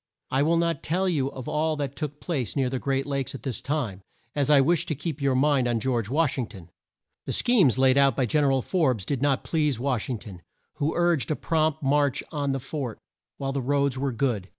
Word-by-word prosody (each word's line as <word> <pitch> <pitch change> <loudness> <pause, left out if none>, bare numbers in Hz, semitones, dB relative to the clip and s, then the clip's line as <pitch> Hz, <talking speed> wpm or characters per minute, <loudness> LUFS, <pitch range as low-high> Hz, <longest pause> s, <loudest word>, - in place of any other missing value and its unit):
I 135 - +2
will 165 +3 +3
not 170 0 0
tell 185 +5 0
you 145 -7 +1
of 130 -2 -8
all 155 +1 0
that 140 -2 -4
took 150 -1 -5
place 140 -10 -3
near 130 -3 +1
the 130 - -2
great 135 0 -1
Lakes 140 -2 -2
at - - -9
this 130 -5 -3
time, 125 -10 -2 0.3
as 145 -2 0
I 145 -2 +7
wish 170 +5 +2
to 155 - -1
keep 150 0 -5
your 135 -2 +2
mind 135 -1 +3
on 120 -1 +1
George 115 -3 -1
Wash 145 0 +1
ing 120 - -1
ton. 95 -6 -13 0.6
The - - -1
schemes 195 - +4
laid 130 +1 +4
out 135 -3 +4
by 130 - +1
Gen 145 +5 +2
er 135 - +3
al 135 -2 +1
Forbes 130 - +1
did 135 +1 -2
not 140 -1 +1
please 150 -7 0
Wash 130 -3 -1
ing 125 - -1
ton, 95 -5 -11 0.4
who 150 +1 -1
urged 175 -4 +2
a 155 - +1
prompt 155 -1 0
march 145 +1 +2
on 145 -3 -1
the 135 - -1
fort, 130 -3 -5 0.4
while 135 -1 -2
the 135 0 -2
roads 140 0 +1
were 135 +1 -1
good. 115 -7 -1
140 Hz, 235 wpm, -26 LUFS, 130-150 Hz, 0.6 s, I